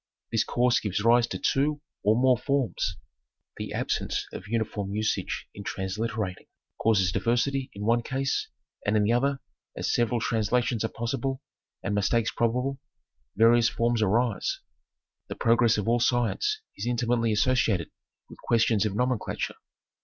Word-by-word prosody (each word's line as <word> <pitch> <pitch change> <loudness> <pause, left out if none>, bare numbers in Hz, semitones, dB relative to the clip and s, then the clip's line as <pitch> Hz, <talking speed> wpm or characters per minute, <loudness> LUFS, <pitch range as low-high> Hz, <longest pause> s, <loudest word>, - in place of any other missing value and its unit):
This 115 -2 +2
course 120 0 +2
gives 100 -1 -2
rise 120 +1 +5
to - - -4
two 145 +2 +1 0.2
or 105 +2 +3
more 130 0 +5
forms. 135 +1 -1 0.6
The - - -5
absence - - -1
of - - -7
uniform 105 -3 -2
usage 110 0 -2
in 100 - -8
transliterating, 100 0 -3 0.3
causes 95 -5 +3
diversity 130 +5 0
in 105 +1 -5
one 120 +2 +3
case, 135 +3 -1 0.4
and 105 +1 +2
in 105 - +3
the 110 +3 +2
other 135 +3 +1 0.4
as - - -1
several 120 0 +1
translations 115 +1 0
are - - +1
possible, 135 +3 -3 0.4
and 100 - -1
mistakes 110 +3 +1
probable, 125 +4 0 0.6
various 115 +2 +5
forms 115 -1 0
arise. 110 +2 +1 0.7
The - - -6
progress 115 -1 +3
of 105 - -2
all 120 +1 +3
science 125 - +1
is - - -4
intimately 120 -1 +1
associated 105 -5 +1 0.4
with - - -14
ques 115 -1 +2
tions 110 -2 +2
of 100 - -4
nomenclature. 125 0 -1
115 Hz, 145 wpm, -27 LUFS, 110-125 Hz, 0.7 s, rise